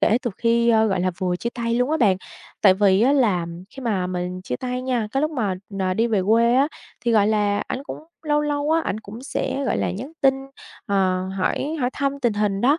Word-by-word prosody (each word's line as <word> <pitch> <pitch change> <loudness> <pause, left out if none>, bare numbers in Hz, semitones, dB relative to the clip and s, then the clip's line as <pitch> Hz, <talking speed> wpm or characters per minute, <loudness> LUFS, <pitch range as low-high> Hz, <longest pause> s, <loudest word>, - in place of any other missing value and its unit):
kể 225 +3 +3
từ 240 - -1
khi, 235 0 +2
a, 220 -1 +5
gọi 190 -3 0
là, 185 +1 +1
vừa 180 -1 0
chia 235 - -3
tay 235 -1 -1
luôn 250 +4 +1
á 315 - +2
bạn. 200 -9 +3 0.5
Tại 190 -3 +7
vì 195 -1 +3
á 270 +3 +4
là 205 -11 +2 0.2
khi 270 - -10
mà 200 -7 0
mình 180 0 -4
chia 125 - -3
tay 250 0 -4
nha, 245 -4 -1
cái 270 - +1
lúc 305 +1 +1
mà, 215 -10 -1 0.2
ờ, 185 -1 0
đi 225 +4 +2
về 210 -5 +1
quê 230 +2 +4
á 275 +3 +4 0.4
thì, 235 - +2
gọi 210 -2 +4
là, 205 -1 +1
ảnh 260 - -4
cũng - - -7 0.2
lâu 295 -1 +1
lâu 295 0 -1
á, 325 +1 +3
ảnh 215 -8 -3
cũng 220 +3 -10
sẽ, 275 0 -2
gọi 260 - 0
là, - - 0
nhắn 255 - -6
tin, 270 -1 +5 0.5
ờ, 185 -2 +1
hỏi 290 +11 -1
hỏi 250 0 +1
thăm 280 0 -2
tình 240 -3 +2
hình 205 -1 0
đó. 280 +7 +3
230 Hz, 245 wpm, -22 LUFS, 195-265 Hz, 0.5 s, Tại